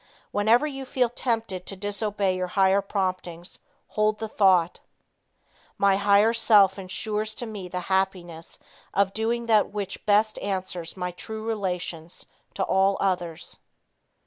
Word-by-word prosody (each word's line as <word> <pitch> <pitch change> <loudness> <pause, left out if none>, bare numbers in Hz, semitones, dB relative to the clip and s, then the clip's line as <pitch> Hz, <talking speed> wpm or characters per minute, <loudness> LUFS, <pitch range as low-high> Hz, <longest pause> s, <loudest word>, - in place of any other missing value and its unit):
Whenever 220 +7 +3
you 270 -3 -5
feel 255 -2 0
tempted 225 -6 -3
to 195 - -3
disobey 205 -1 -1
your 185 0 -2
higher 195 +1 +4
promptings, 185 -3 -4 0.3
hold 215 0 +1
the 220 - -4
thought 185 -5 +3 1.0
"My 200 -1 +3
higher 200 +2 +4
self 205 -4 +4
insures 215 +3 -3
to 240 - -5
me 210 -5 -7
the 180 0 -4
happiness 180 -3 -2 0.4
of 195 -1 +2
doing 230 +2 -1
that 220 -2 +3
which 200 -2 -5
best 215 +1 +3
answers 185 -3 -4
my 180 0 -3
true 220 +4 -7
relations 180 -6 -4 0.3
to 195 - -1
all 195 +1 +2
others." 175 -4 -3
200 Hz, 135 wpm, -25 LUFS, 185-215 Hz, 1.0 s, higher